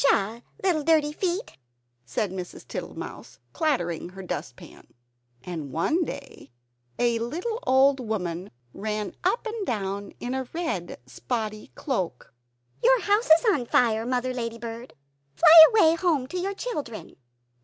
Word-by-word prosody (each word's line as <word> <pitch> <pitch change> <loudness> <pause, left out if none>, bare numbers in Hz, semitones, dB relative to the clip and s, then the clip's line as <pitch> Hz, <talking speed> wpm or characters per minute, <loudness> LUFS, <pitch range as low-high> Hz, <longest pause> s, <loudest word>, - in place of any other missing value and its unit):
"Shuh! 280 - +4 0.3
shuh! - - -24 0.2
little 350 -5 +2
dirty 305 -1 +3
feet!" 370 +6 -3 0.5
said 190 - -1
Mrs. 185 -2 -7
Tittlemouse, - - -7 0.2
clattering 175 - -1
her 190 +1 -10
dustpan. 180 - -7 0.6
And 160 -6 -6
one 310 - +1
day 280 -3 -8 0.5
a 235 -1 +1
little 345 - -3
old 270 +1 +5
woman 190 -6 -3 0.2
ran 210 +1 -3
up 480 - +1
and 445 -1 -3
down 200 - -3
in 245 +1 -4
a 260 -1 -3
red 320 - -3
spotty 215 - -4
cloak. 185 - -3 0.5
"Your - - +5
house 415 +4 +1
is 320 +7 +6
on 245 -8 -2
fire, 225 -1 +2
Mother 255 0 -1
Ladybird! 230 0 -6 0.4
Fly 320 -1 +10
away 370 -8 +5
home 330 -6 +1
to 365 - -4
your 395 +2 -2
children!" 300 - -6
255 Hz, 135 wpm, -26 LUFS, 210-330 Hz, 0.6 s, Fly